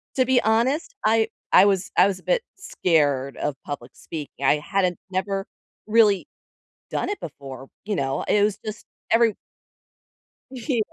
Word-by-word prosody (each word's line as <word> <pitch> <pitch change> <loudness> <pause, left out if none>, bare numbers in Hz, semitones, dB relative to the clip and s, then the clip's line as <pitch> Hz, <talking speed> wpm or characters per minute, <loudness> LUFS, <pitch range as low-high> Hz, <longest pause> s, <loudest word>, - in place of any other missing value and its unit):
to 255 -1 +3
be 260 -1 +3
honest, 235 +8 +1
I 220 0 +3 0.2
I - - +9
was 195 -2 +1
I 195 - +7
was 190 -2 -2
a - - -20
bit - - +2 0.2
scared 145 - +1
of 145 -2 -2
public 135 -4 -6
speaking, 150 -3 -8
I 150 - +5
hadn't 185 +1 0
never 195 +1 -2 0.4
really 210 -3 +4 0.6
done - - -1
it 410 - -4
before, 135 -3 -9 0.2
you 205 -2 -2
know, 135 -2 -1
it 205 - +4
was 210 -1 +1
just 215 0 -6 0.2
every 230 -2 +4 1.2
Yeah. 255 -1 -2
195 Hz, 155 wpm, -24 LUFS, 150-225 Hz, 1.2 s, I